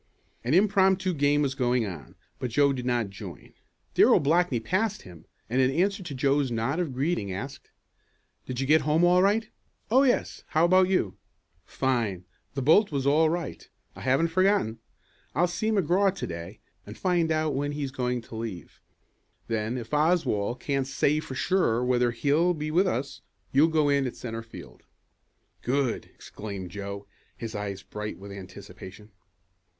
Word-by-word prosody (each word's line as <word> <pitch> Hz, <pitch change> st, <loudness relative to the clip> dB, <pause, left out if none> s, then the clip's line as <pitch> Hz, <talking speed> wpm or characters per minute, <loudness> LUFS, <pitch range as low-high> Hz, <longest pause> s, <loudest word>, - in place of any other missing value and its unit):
An 125 Hz, +7 st, +1 dB
impromptu 190 Hz, -1 st, +3 dB
game 145 Hz, -1 st, +2 dB
was 135 Hz, -2 st, 0 dB
going 125 Hz, -3 st, +1 dB
on, 80 Hz, -10 st, -8 dB, 0.2 s
but 130 Hz, -2 st, -3 dB
Joe 140 Hz, +4 st, +3 dB
did 125 Hz, -1 st, -4 dB
not 120 Hz, -5 st, 0 dB
join. 95 Hz, -, -10 dB, 0.4 s
Darrell -, -, +6 dB
Blackney 155 Hz, -3 st, +2 dB
passed 190 Hz, -, -1 dB
him, 85 Hz, -3 st, -13 dB, 0.2 s
and 125 Hz, +4 st, +1 dB
in 130 Hz, -, +4 dB
answer 195 Hz, +8 st, +1 dB
to 160 Hz, -6 st, -6 dB
Joe's 140 Hz, +1 st, +2 dB
nod 120 Hz, +7 st, -1 dB
of 170 Hz, -6 st, -1 dB
greeting 130 Hz, -, -1 dB
asked: 130 Hz, +8 st, -7 dB, 0.8 s
"Did 125 Hz, -1 st, -4 dB
you 135 Hz, -, 0 dB
get 155 Hz, +3 st, +5 dB
home 155 Hz, +4 st, +2 dB
all 180 Hz, +1 st, +5 dB
right?" 210 Hz, +3 st, +2 dB, 0.4 s
"Oh, 260 Hz, +3 st, +6 dB
yes. 265 Hz, -3 st, +1 dB
How 160 Hz, +2 st, +3 dB
about 185 Hz, +1 st, +4 dB
you?" 185 Hz, -, 0 dB, 0.5 s
"Fine. 115 Hz, -9 st, -1 dB, 0.3 s
The 135 Hz, -, -2 dB
bolt 165 Hz, -, +5 dB
was 140 Hz, -2 st, -1 dB
all 155 Hz, +3 st, +4 dB
right. 170 Hz, 0 st, -4 dB, 0.3 s
I -, -, -10 dB
haven't 135 Hz, +6 st, +2 dB
forgotten. 185 Hz, -, +2 dB, 0.6 s
I'll 175 Hz, -, +4 dB
see 180 Hz, +5 st, -2 dB
McGraw 195 Hz, -1 st, +2 dB
to -, -, -4 dB
day 85 Hz, +4 st, -8 dB, 0.2 s
and 105 Hz, +2 st, -10 dB
find 175 Hz, -3 st, +1 dB
out 155 Hz, -1 st, +1 dB
when 145 Hz, +2 st, -2 dB
he's 145 Hz, -2 st, -3 dB
going 125 Hz, -2 st, -2 dB
to 115 Hz, -, -11 dB
leave. 110 Hz, -6 st, -7 dB, 0.7 s
Then 115 Hz, +2 st, -2 dB
if 115 Hz, +2 st, -8 dB
Oswald 150 Hz, -, +1 dB
can't 135 Hz, -2 st, -1 dB
say 145 Hz, +2 st, +1 dB
for 135 Hz, -4 st, -7 dB
sure 125 Hz, -8 st, +1 dB
whether 125 Hz, -1 st, +2 dB
he'll 150 Hz, +9 st, +2 dB
be 155 Hz, 0 st, -4 dB
with 185 Hz, +4 st, +3 dB
us, 140 Hz, -5 st, -3 dB, 0.3 s
you'll 145 Hz, +4 st, +5 dB
go 155 Hz, -2 st, +2 dB
in 140 Hz, -2 st, +2 dB
at 125 Hz, -, -6 dB
centre 115 Hz, -2 st, -5 dB
field." 115 Hz, 0 st, -12 dB, 0.8 s
"Good!" 130 Hz, -1 st, 0 dB
exclaimed 100 Hz, -4 st, -8 dB
Joe, 100 Hz, 0 st, -6 dB, 0.3 s
his 115 Hz, -1 st, -6 dB
eyes 100 Hz, -2 st, -5 dB
bright 105 Hz, 0 st, -6 dB
with 100 Hz, +1 st, -10 dB
anticipation. 100 Hz, +1 st, -11 dB
135 Hz, 165 wpm, -27 LUFS, 115-170 Hz, 0.8 s, Darrell